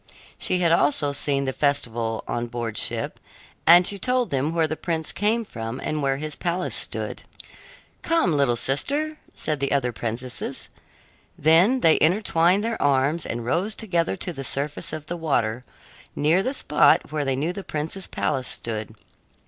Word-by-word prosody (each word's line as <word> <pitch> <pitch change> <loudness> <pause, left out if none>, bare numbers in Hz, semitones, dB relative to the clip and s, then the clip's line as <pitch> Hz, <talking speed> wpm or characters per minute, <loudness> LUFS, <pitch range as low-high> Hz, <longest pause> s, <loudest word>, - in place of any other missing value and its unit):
She 185 - 0
had 170 -2 +3
also 145 -2 +3
seen 140 0 0
the 130 - -2
festival 120 -6 -1
on 120 0 -2
board 115 -2 -4
ship, - - -1 0.5
and 175 +2 +8
she 200 +1 +1
told 250 +1 0
them 140 +3 0
where 165 -1 +2
the 155 0 -2
prince 160 -2 -1
came 220 +3 0
from 115 - -6
and 155 0 -3
where 135 -1 0
his 150 +1 -4
palace 180 +1 -2
stood. - - -3 0.8
"Come, 330 - +2
little 140 -4 +2
sister," 290 - -1 0.2
said 150 -2 -2
the 140 0 -1
other 135 -3 +1
princesses. 120 +5 -3 0.7
Then 175 - +4
they 160 - +5
entwined 180 +2 +3
their 230 0 -2
arms 145 +3 +2
and 115 0 -4
rose 190 - 0
together 175 -6 0
to 180 -1 -2
the 135 - -6
surface 140 +3 0
of 155 -1 -6
the 175 +3 -5
water, 125 -7 -1 0.5
near 160 +6 +3
the 260 +6 -2
spot 150 - +3
where 150 -1 -1
they 135 -1 0
knew 155 +7 -1
the 195 - -7
prince's 160 +5 -2
palace 135 -4 -2
stood. 110 -1 -3
150 Hz, 165 wpm, -24 LUFS, 135-175 Hz, 0.8 s, and